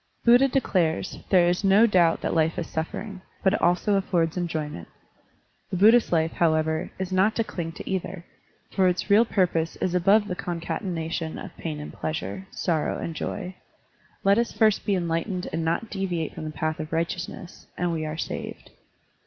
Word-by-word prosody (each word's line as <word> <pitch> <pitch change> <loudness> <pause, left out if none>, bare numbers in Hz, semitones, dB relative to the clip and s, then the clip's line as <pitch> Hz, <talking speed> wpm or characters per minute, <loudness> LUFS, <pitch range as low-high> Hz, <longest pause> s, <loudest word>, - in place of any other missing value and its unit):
Buddha 245 +3 +7
declares, 185 -11 0
there 180 -3 +5
is 175 +3 0
no 200 +3 +6
doubt 175 -6 +3
that - - -1
life 160 0 +1
is 170 - -2
suffering, 190 +6 -5 0.2
but 190 - +4
it - - -1
also 180 +4 +2
affords 175 -4 +1
enjoyment. 155 - -3 0.8
The 185 - -2
Buddhist 225 +5 +5
life, 160 -1 +2
however, 160 -1 +1
is 190 0 -4
not 190 +4 +3
to 230 - +1
cling 165 -6 -5
to - - -9
either, 190 -2 -3 0.5
for 190 -2 +3
its 180 +3 -1
real 215 +3 +6
purpose 175 -6 0
is 180 - -2
above 200 +4 +4
the 180 - -2
concatenation 165 -1 -3
of - - -9
pain 155 -3 -5
and 150 - -8
pleasure, 190 +4 -4
sorrow 165 -4 -1
and 165 - -4
joy. 185 +2 -4 0.7
Let 200 +3 +4
us 235 - 0
first 215 -2 +2
be 200 - +3
enlightened 180 +2 -2
and 165 0 -1
not 170 +7 -1
deviate 180 -5 -2
from - - -7
the - - -3
path 155 0 -3
of 155 0 -5
righteousness, 170 +1 -4
and 175 -1 0
we 160 -1 -2
are 155 0 -4
saved. - - -6
175 Hz, 175 wpm, -25 LUFS, 165-195 Hz, 0.8 s, Buddha